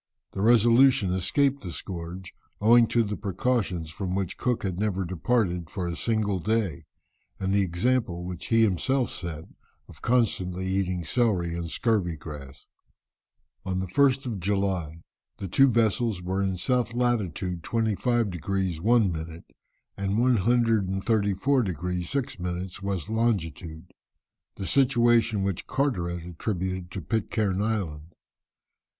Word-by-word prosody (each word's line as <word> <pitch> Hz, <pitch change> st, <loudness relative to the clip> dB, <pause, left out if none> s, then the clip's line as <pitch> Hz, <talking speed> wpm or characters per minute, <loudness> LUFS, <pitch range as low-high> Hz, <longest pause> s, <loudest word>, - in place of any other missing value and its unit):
The 95 Hz, -, -4 dB
Resolution 120 Hz, -1 st, +5 dB
escaped 135 Hz, +10 st, +1 dB
the 90 Hz, -, -6 dB
scourge, 90 Hz, +1 st, -7 dB, 0.3 s
owing 115 Hz, +2 st, +6 dB
to 120 Hz, +1 st, +2 dB
the 105 Hz, -1 st, -3 dB
precautions 95 Hz, -5 st, -1 dB
from 95 Hz, +1 st, -3 dB
which 95 Hz, -3 st, -2 dB
Cook 125 Hz, -2 st, -1 dB
never 95 Hz, 0 st, -1 dB
departed 90 Hz, -1 st, 0 dB
for 90 Hz, -3 st, -3 dB
a 85 Hz, -, -3 dB
single 105 Hz, -2 st, 0 dB
day, 105 Hz, -5 st, -1 dB, 0.5 s
and 95 Hz, 0 st, -1 dB
the 100 Hz, -, +4 dB
example 90 Hz, 0 st, 0 dB
which 90 Hz, -1 st, -6 dB
he 115 Hz, -1 st, +4 dB
himself 120 Hz, +6 st, +1 dB
set 85 Hz, -3 st, -5 dB, 0.4 s
of -, -, -15 dB
constantly 95 Hz, -7 st, 0 dB
eating 95 Hz, -2 st, -1 dB
celery 90 Hz, -5 st, +1 dB
and 85 Hz, -1 st, -4 dB
scurvy 95 Hz, -5 st, 0 dB
grass. 70 Hz, -3 st, -10 dB, 1.0 s
On 95 Hz, -2 st, -2 dB
the 95 Hz, -, -2 dB
1st 135 Hz, +7 st, +2 dB
of 115 Hz, -6 st, -3 dB
July, 95 Hz, -4 st, -1 dB, 0.3 s
the 100 Hz, -, -5 dB
two 135 Hz, +10 st, +5 dB
vessels 115 Hz, -3 st, +1 dB
were 95 Hz, +2 st, -1 dB
in 95 Hz, -1 st, 0 dB
S. 90 Hz, -, -5 dB, 0.3 s
lat. 120 Hz, -1 st, +2 dB, 0.2 s
25 110 Hz, +5 st, -1 dB
degrees 90 Hz, -1 st, -2 dB
1 110 Hz, -2 st, +4 dB
minute, 80 Hz, 0 st, -7 dB, 0.5 s
and 100 Hz, +1 st, -1 dB
134 115 Hz, 0 st, +2 dB
degrees 90 Hz, -2 st, -3 dB
6 140 Hz, -6 st, -2 dB
minutes 90 Hz, +1 st, -4 dB
W. 100 Hz, -2 st, -2 dB
long., 115 Hz, -2 st, +3 dB, 1.2 s
the 95 Hz, -, -5 dB
situation 120 Hz, -2 st, +3 dB
which 95 Hz, -3 st, -2 dB
Carteret 85 Hz, -, -1 dB
attributed 90 Hz, 0 st, -3 dB
to 95 Hz, -, -6 dB
Pitcairn 100 Hz, -1 st, -1 dB
Island. 85 Hz, -8 st, -3 dB
95 Hz, 130 wpm, -26 LUFS, 90-115 Hz, 1.2 s, owing